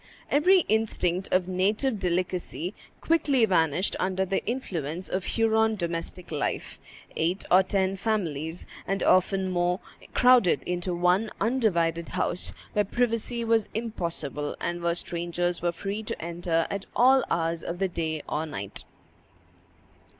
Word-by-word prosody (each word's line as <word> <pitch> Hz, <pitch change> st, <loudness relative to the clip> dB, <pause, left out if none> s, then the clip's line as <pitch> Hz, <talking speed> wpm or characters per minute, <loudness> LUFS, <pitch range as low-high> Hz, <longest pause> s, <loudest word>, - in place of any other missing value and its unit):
Every 360 Hz, +6 st, +5 dB
instinct 195 Hz, -, 0 dB
of 185 Hz, -1 st, +2 dB
native 205 Hz, +6 st, +1 dB
delicacy 180 Hz, 0 st, -2 dB, 0.3 s
quickly 290 Hz, -7 st, +3 dB
vanished 175 Hz, -2 st, +2 dB
under 190 Hz, 0 st, 0 dB
the 195 Hz, +1 st, -1 dB
influence 180 Hz, -, -3 dB
of 185 Hz, 0 st, -2 dB
Huron 220 Hz, -1 st, +2 dB
domestic 170 Hz, -1 st, -4 dB
life; 150 Hz, -2 st, -3 dB, 0.4 s
eight 175 Hz, +4 st, 0 dB
or 185 Hz, -, +8 dB
ten 190 Hz, 0 st, 0 dB
families, 170 Hz, -6 st, -2 dB, 0.2 s
and 195 Hz, +1 st, -1 dB
often 190 Hz, 0 st, +3 dB
more, 175 Hz, +1 st, +1 dB, 0.4 s
crowded 245 Hz, -, +5 dB
into 180 Hz, 0 st, -2 dB
one 180 Hz, +5 st, +2 dB
undivided 170 Hz, -8 st, +1 dB
house, 180 Hz, -, -1 dB, 0.2 s
where 210 Hz, -, +3 dB
privacy 235 Hz, +2 st, 0 dB
was 225 Hz, -2 st, +2 dB
impossible, 170 Hz, -10 st, -3 dB
and 175 Hz, 0 st, -3 dB
where 170 Hz, 0 st, +1 dB
strangers 175 Hz, 0 st, -2 dB
were 175 Hz, 0 st, +1 dB
free 200 Hz, +5 st, -4 dB
to 215 Hz, -, -5 dB
enter 170 Hz, 0 st, -1 dB
at 200 Hz, -1 st, -4 dB
all 260 Hz, +1 st, +5 dB
hours 165 Hz, 0 st, 0 dB
of 170 Hz, -, -4 dB
the 195 Hz, +1 st, +1 dB
day 160 Hz, -3 st, -3 dB
or 155 Hz, +2 st, -2 dB
night. 100 Hz, -9 st, -6 dB
185 Hz, 135 wpm, -27 LUFS, 170-220 Hz, 0.4 s, or